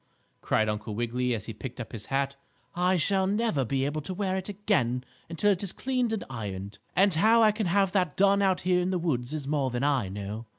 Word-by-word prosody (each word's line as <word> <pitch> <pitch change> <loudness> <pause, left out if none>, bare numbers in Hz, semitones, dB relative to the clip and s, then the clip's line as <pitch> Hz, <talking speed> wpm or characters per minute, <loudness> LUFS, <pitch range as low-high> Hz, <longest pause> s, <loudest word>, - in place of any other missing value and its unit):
cried 110 - +1
Uncle 105 0 -3
Wiggily, 120 +2 0
as 110 - -6
he 115 - -6
picked 125 +4 -8
up 115 - -6
his 105 -3 -7
hat. 140 0 0 0.4
"I 180 +1 +2
shall 190 +3 +2
never 205 - +1
be 135 +3 0
able 150 +2 -2
to 185 +5 -5
wear 190 -1 -1
it 190 +1 -4
again 185 - 0 0.3
until 185 +5 +2
it 185 - 0
is 200 -3 -2
cleaned 255 -3 -1
and 220 - -2
ironed. 100 -4 -6 0.2
And 195 0 +4
how 220 +7 +5
I 215 - +6
can 210 -2 -2
have 195 +1 +2
that 180 -6 0
done 200 +1 +4
out 190 -2 +2
here 180 0 +2
in 180 - 0
the 185 - 0
woods 135 -7 -1
is 150 -3 -4
more 140 -3 +1
than 125 +1 -2
I 135 -9 +1
know." 105 +3 -6
155 Hz, 230 wpm, -28 LUFS, 120-195 Hz, 0.4 s, I